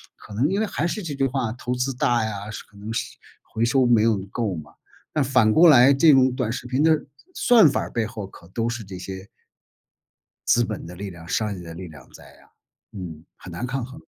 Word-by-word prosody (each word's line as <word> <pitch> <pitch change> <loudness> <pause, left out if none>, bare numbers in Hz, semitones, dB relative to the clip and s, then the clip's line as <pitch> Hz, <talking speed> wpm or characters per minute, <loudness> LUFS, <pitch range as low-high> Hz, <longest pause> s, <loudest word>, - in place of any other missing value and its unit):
可 105 - -13
能 125 +8 +1
因 195 +2 0
为 - - +2
还 170 -4 -2
是 210 +2 -4
这 155 -4 -4
句 135 0 +1
话， 125 -4 -2
投 125 0 -4
资 125 +2 -1
大 120 -2 +1
呀， 105 -1 -5
是 105 - -7
可 100 - -21
能 105 +2 -7
是 - - -4 0.3
回 115 +1 -2
收 130 +1 +3
没 120 -3 +4
有 110 -3 +3
够 110 -7 -2
嘛。 80 -2 -9 0.4
那 150 - +1
反 130 -5 +3
过 170 +1 +7
来 135 0 +7
这 150 +2 +6
种 130 -1 +4
短 125 -4 -2
视 125 - -5
频 130 +3 0
的， 160 -1 +3 0.3
算 225 - +6
法 - - -1
儿 - - -6
背 110 -2 -1
后 110 -2 -7
可 85 -3 -15
都 115 +3 -2
是 115 -1 -4
这 95 -1 -8
些 95 +1 -8 1.2
资 120 0 +4
本 110 -6 -5
的 90 - -9
力 100 +1 -6
量、 85 -1 -12
商 105 -2 -1
业 90 - -9
的 80 -1 -9
力 90 0 -8
量 75 -5 -14
在 - - -14 0.2
啊， - - -24 0.4
嗯， 85 -5 -8
很 90 - -11
难 105 +9 -4
抗 130 0 -3
衡。 135 +5 -11
115 Hz, 255 characters per minute, -23 LUFS, 100-135 Hz, 1.2 s, 过